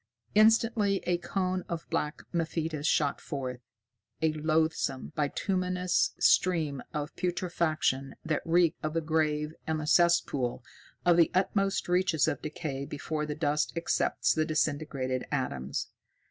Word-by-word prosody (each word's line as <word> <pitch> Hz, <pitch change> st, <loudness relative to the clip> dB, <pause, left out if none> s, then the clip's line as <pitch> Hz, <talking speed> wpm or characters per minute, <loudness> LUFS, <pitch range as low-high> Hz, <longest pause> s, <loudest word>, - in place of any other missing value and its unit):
Instantly 215 Hz, -2 st, +4 dB
a 175 Hz, -1 st, +1 dB
cone 185 Hz, 0 st, -1 dB
of 170 Hz, -1 st, -4 dB
black 150 Hz, +1 st, -2 dB
mephitis 160 Hz, -2 st, -1 dB
shot 145 Hz, -3 st, +1 dB
forth, 130 Hz, -3 st, -4 dB, 0.6 s
a 160 Hz, -1 st, +1 dB
loathsome, 155 Hz, -3 st, 0 dB
bituminous 180 Hz, +4 st, 0 dB
stream 160 Hz, -7 st, +3 dB
of 150 Hz, +1 st, -4 dB
putrefaction 170 Hz, -6 st, -1 dB
that 155 Hz, -1 st, 0 dB
reeked 170 Hz, -1 st, +2 dB
of 155 Hz, +1 st, -2 dB
the 165 Hz, -, +2 dB
grave 155 Hz, -1 st, 0 dB
and 160 Hz, -1 st, 0 dB
the 155 Hz, -, -4 dB
cesspool, 150 Hz, -7 st, +2 dB, 0.4 s
of 175 Hz, -1 st, +5 dB
the 170 Hz, -, +5 dB
utmost 195 Hz, +1 st, +1 dB
reaches 180 Hz, -4 st, +2 dB
of -, -, -1 dB
decay 150 Hz, -3 st, -4 dB
before 150 Hz, +2 st, -4 dB
the 150 Hz, -, -3 dB
dust 150 Hz, -1 st, 0 dB
accepts 170 Hz, -, +1 dB
the 155 Hz, -, +1 dB
disintegrated 145 Hz, -4 st, -1 dB
atoms. 70 Hz, -, -2 dB
160 Hz, 130 wpm, -29 LUFS, 150-175 Hz, 0.6 s, of